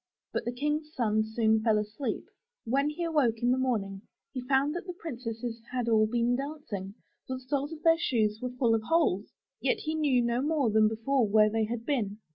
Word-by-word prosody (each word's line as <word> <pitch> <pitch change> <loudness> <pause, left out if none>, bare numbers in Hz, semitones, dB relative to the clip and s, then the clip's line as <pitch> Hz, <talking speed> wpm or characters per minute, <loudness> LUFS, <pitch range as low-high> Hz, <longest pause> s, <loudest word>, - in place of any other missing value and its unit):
But - - -2
the 240 - -1
King's 300 +4 -2
son 220 -4 +2
soon 220 0 +2
fell 220 -1 +3
asleep. 210 +6 -3 0.4
When 275 +5 +1
he 300 +3 -4
awoke 295 -9 +2
in 245 - +4
the 255 - +2
morning 200 -7 -1 0.3
he 255 - -3
found 270 +3 +2
that 350 +2 -5
the 360 - -5
princesses 235 -5 -5
had 250 -2 -1
all 215 -1 +4
been 240 +2 +1
dancing, 250 -9 -5 0.3
for 260 - -3
the 255 - -8
soles 280 +3 -2
of 320 -1 -9
their 330 0 +5
shoes 220 -9 +1
were 250 - -2
full 245 -2 +1
of 225 - +2
holes, 220 - +1 0.3
yet 475 - +1
he 310 - -2
knew 285 -6 +2
no 235 +1 0
more 290 -5 +1
than 215 0 +5
before 225 +3 +1
where 215 +1 +4
they 220 0 +1
had 230 +1 -4
been. 220 -8 -1
245 Hz, 210 wpm, -29 LUFS, 220-285 Hz, 0.4 s, their